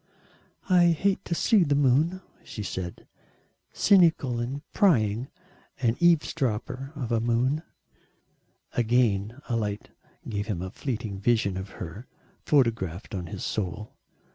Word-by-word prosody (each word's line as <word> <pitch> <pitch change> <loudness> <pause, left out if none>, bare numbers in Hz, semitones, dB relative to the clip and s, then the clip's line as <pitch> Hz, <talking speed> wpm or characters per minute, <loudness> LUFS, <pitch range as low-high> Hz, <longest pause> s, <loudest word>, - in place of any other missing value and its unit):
"I 180 -2 +5
hate 185 +4 +1
to 170 - -1
see 205 +2 +4
the 145 -3 +1
moon," 145 +7 +2 0.2
she 105 - -7
said, 90 -2 -6 0.6
"cynical 165 - +4
and 135 +5 -4
prying 120 - +3 0.5
an 120 -3 +1
eavesdropper 135 -5 +1
of 125 -5 -4
a 115 - +2
moon." 120 +6 +1 1.1
Again 115 -1 +1
a 120 - -1
light 105 -2 -3 0.4
gave 105 0 -3
him 95 -5 -2
a 95 - -6
fleeting 110 -7 -4
vision 105 -2 +1
of 95 +1 -5
her 100 +8 -8 0.4
photographed 115 - +1
on 90 -3 -3
to 80 - -10
his - - -5
soul. 105 +2 -3
120 Hz, 130 wpm, -27 LUFS, 105-145 Hz, 1.1 s, I